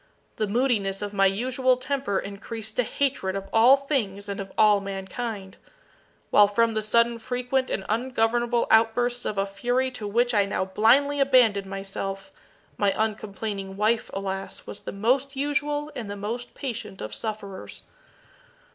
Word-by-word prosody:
The 215 - 0
moodiness 205 -4 0
of 205 0 -5
my 195 -1 +4
usual 255 +5 +1
temper 260 -5 -1
increased 215 +2 -5
to - - +5
hatred 235 -7 -1
of 195 0 -4
all 240 +5 +7
things 220 -9 -2
and 200 0 -4
of 195 -1 -6
all 210 -1 +6
mankind; 195 +1 -5 0.7
while 205 - +7
from 230 +3 +2
the 215 - 0
sudden 235 +2 +2
frequent 250 +2 -1
and 190 - -2
ungovernable 240 +1 +1
outbursts 240 +2 +3
of 210 - -2
a 195 - +2
fury 245 +6 -1
to 220 -5 -6
which 240 +4 +1
I 205 -2 +4
now 200 -1 -1
blindly 245 +9 +3
abandoned 245 -8 +4
myself, 195 +4 -5 0.5
my 200 -1 +2
uncomplaining 205 -2 -3
wife, 220 +2 +1
alas! 195 -1 -5
was 205 - -8
the - - -7
most 255 +7 0
usual 290 +1 -1
and 220 -4 -5
the 205 - -4
most 230 +4 -5
patient 235 -7 -5
of 110 - -6
sufferers. 210 -3 -6
220 Hz, 155 wpm, -25 LUFS, 200-250 Hz, 0.7 s, all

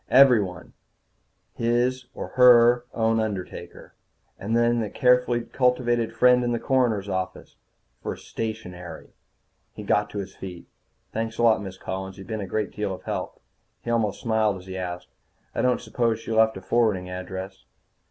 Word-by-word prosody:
Everyone 110 -9 +4 0.8
his, 120 +2 0
or - - -5
her, 120 -1 +6
own 115 -1 +1
undertaker. 100 -4 -5 0.5
And 110 +4 0
the 120 -2 +2
carefully 125 -1 +3
cultivated 120 -1 +1
friend 125 0 +4
in 120 0 0
the 120 - -1
coroner's 120 -7 +1
office. 95 -1 -4 0.5
For - - -4
stationery. 90 -7 -7 0.6
He 105 - -7
got 105 +1 +1
to 105 - -7
his 95 -1 -5
feet. 90 -3 -8 0.5
"Thanks 115 0 -3
a - - 0
lot, 115 -2 +5
Miss 95 -2 -7
Collins. 95 0 -6
You've 95 - -10
been 110 -2 -4
a 100 - -5
great 105 +2 -2
deal 105 -2 -3
of - - -15
help." - - -4 0.4
He 120 - -3
almost 110 -4 0
smiled 110 -3 +1
as 90 - -12
he 95 0 -7
asked, 90 -1 -5 0.4
"I - - -1
don't 125 -1 +2
suppose 115 -2 0
she 115 - -7
left 110 -1 +3
a - - -8
forwarding 105 -3 +1
address?" 95 +1 -7
110 Hz, 160 wpm, -25 LUFS, 95-120 Hz, 0.8 s, her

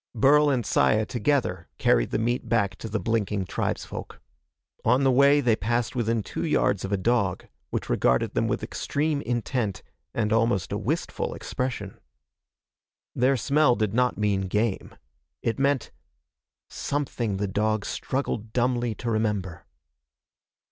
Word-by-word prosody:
Burl 145 +5 +5
and 125 -5 0
Saya, 95 +5 +3
together, 115 - 0
carried - - +3
the - - 0
meat 120 +1 -1
back 100 -5 +1
to 110 - -7
the 110 +1 -1
blinking 105 -4 -1
tribesfolk. - - -4 0.6
On 125 +4 +3
the 135 - +4
way 140 +3 +5
they 120 -4 +3
passed 120 +3 -1
within 115 -2 0
two - - -5
yards - - +1
of 95 - -4
a 100 - +2
dog 100 -2 0 0.2
which - - -3
regarded 60 0 +2
them - - +1
with - - -2
extreme 145 0 -1
intent 120 -4 -2 0.3
and 110 +2 0
almost 115 -4 +1
a - - -1
wistful - - -2
expression. 120 -7 -4 1.1
Their 130 +2 +2
smell 140 +1 +3
did 110 -3 -1
not 125 +1 +2
mean 100 -2 0
game. 105 +1 -1 0.5
It 115 - -1
meant 140 -2 +1 0.8
something 120 -8 -2
the 100 - -1
dog 110 +1 0
struggled 115 -5 -3
dumbly 120 -2 +1
to 120 - -3
remember. 105 -6 -2
115 Hz, 140 wpm, -26 LUFS, 105-125 Hz, 1.1 s, Burl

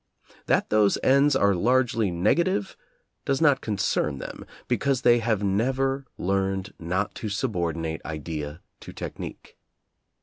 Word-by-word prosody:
That - - +1
those 105 -2 +4
ends 140 +1 +4
are 100 -6 +4
largely 120 +2 +2
negative 105 - +1 0.5
does 135 -1 0
not 145 -4 +4
concern 100 -8 -1
them, - - -8 0.2
because 135 -2 0
they 120 -1 +5
have 110 -3 0
never 135 +7 0
learned 95 +1 -1
not 90 +5 -2
to 110 - -3
subordinate 85 -7 -2
idea 75 0 -5 0.2
to - - -10
technique. - - -8
105 Hz, 125 wpm, -25 LUFS, 90-130 Hz, 0.5 s, they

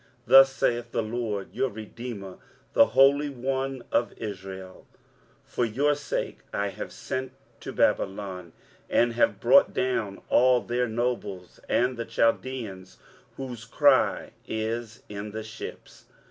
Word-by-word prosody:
23:043:014 - - -31 0.2
Thus 135 0 +8
saith 120 -2 0
the 115 - +1
LORD, 110 -3 -3
your 135 - 0
redeemer, 110 -2 -8 0.4
the - - +7
Holy 135 +4 +4
One 135 0 -3
of 120 - +1
Israel; 95 -3 -8 0.6
For - - -2
your 135 +6 +2
sake 145 0 -3
I 100 0 -1
have - - -7
sent 130 0 -4 0.3
to - - -7
Babylon, 95 -3 0 0.4
and 120 0 +3
have 120 - +2
brought - - +5
down 115 -6 -1
all 125 0 +4
their 125 +1 -1
nobles, 110 -6 -3
and 125 0 +2
the 115 - -3
Chaldeans, 115 -4 -1 0.4
whose 125 -4 -6
cry 125 - +3 0.2
is 110 +1 -4
in 105 0 -6
the 110 0 -4
ships. 110 0 -10
115 Hz, 130 wpm, -27 LUFS, 105-130 Hz, 0.6 s, Thus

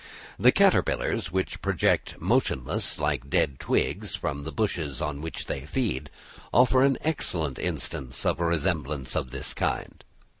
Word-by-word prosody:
The - - +7
caterpillars - - +2
which 95 +1 -2
project - - +1
motionless 65 - +1
like 75 -3 -1
dead 70 -1 +1
twigs - - 0
from 70 +1 -3
the 80 - -4
bushes 80 - -2
on 75 -1 -3
which 80 +1 -5
they 65 - -3
feed, 75 - -2 0.4
offer 125 +1 +5
an 135 -1 +4
excellent 85 - -1
instance 65 -2 -2
of - - +1
a 85 - +1
resemblance 75 -5 -1
of 65 - -1
this 65 +1 -4
kind. - - -2
75 Hz, 145 wpm, -27 LUFS, 70-95 Hz, 0.4 s, The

